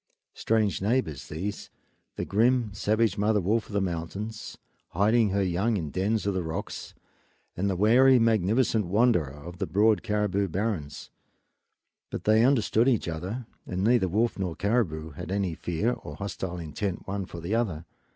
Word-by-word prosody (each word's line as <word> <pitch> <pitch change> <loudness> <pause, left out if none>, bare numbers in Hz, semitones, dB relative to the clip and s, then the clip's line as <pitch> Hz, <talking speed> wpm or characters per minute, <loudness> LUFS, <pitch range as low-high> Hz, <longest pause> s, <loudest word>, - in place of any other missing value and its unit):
Strange 110 -4 0
neighbors 105 - -1
these, 95 +7 -5 0.5
the - - -3
grim, 115 +1 +2
savage 105 0 +1
mother 105 +1 +3
wolf 105 +5 0
of - - -11
the 100 - +2
mountains, 95 +4 -4 0.4
hiding 110 +4 +3
her 100 +1 +1
young 95 +5 +1
in 80 -6 -4
dens 100 +4 0
of 100 - +1
the 95 - -1
rocks, 80 -1 -5 0.6
and 100 +3 0
the 95 - 0
wary, 125 +7 +5
magnificent 110 -1 +2
wanderer 100 - +3
of 75 +5 -10
the - - -1
broad 105 +2 +3
caribou 105 -3 0
barrens; 90 -6 -3 1.0
but - - -5
they 110 +1 +4
understood 120 -2 +3
each 120 -9 +2
other, 90 +10 -4 0.2
and 90 +1 -2
neither 115 -3 +3
wolf 110 +4 0
nor 90 -4 -2
caribou 80 -6 -1
had 90 - -8
any 100 -3 0
fear 90 +8 -1
or 75 - -8
hostile 95 -1 -5
intent 85 +4 -4
one 100 0 -2
for 85 - -8
the 85 +5 -4
other. 95 -9 -1
100 Hz, 160 wpm, -27 LUFS, 90-110 Hz, 1.0 s, wary